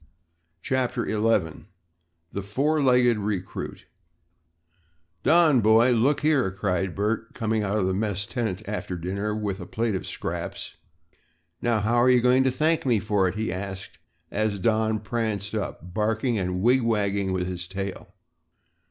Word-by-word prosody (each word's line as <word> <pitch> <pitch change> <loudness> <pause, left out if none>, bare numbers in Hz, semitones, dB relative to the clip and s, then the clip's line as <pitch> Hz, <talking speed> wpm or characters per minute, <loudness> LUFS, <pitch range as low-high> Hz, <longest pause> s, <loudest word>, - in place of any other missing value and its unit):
CHAPTER 130 -2 0
XI 105 -7 0 0.7
THE 100 - -2
FOUR 140 +10 0
LEGGED 125 -4 +4
RECRUIT 100 -3 -4 1.4
"Don, 160 -6 +5
boy, 110 +3 +5
look 125 +5 +2
here," 145 -7 +3
cried 95 -1 -2
Bert, 110 +3 -2
coming 110 -2 0
out 100 +1 0
of 100 - +1
the 95 - 0
mess 100 0 -1
tent 110 -4 -3
after 100 -3 -4
dinner 100 +5 -3
with 105 -3 -3
a 90 - -8
plate 115 -1 -1
of 95 - -3
scraps. - - -5 0.9
"Now 115 -2 +1
how 115 +3 +1
are 120 +2 +5
you 125 -1 +6
going 125 +2 +4
to 130 - +3
thank 155 +5 +1
me 120 -4 +2
for 100 -2 +1
it?" 90 - -3
he 110 -4 -2
asked 95 0 -7 0.3
as 105 -1 0
Don 110 +2 +1
pranced 110 -2 -2
up, 95 -4 -5
barking 110 +3 0
and 90 0 -2
wig 125 +3 +4
wagging 100 -4 0
with 90 -1 -1
his 90 -1 -5
tail. 95 0 -6
110 Hz, 150 wpm, -25 LUFS, 95-120 Hz, 1.4 s, you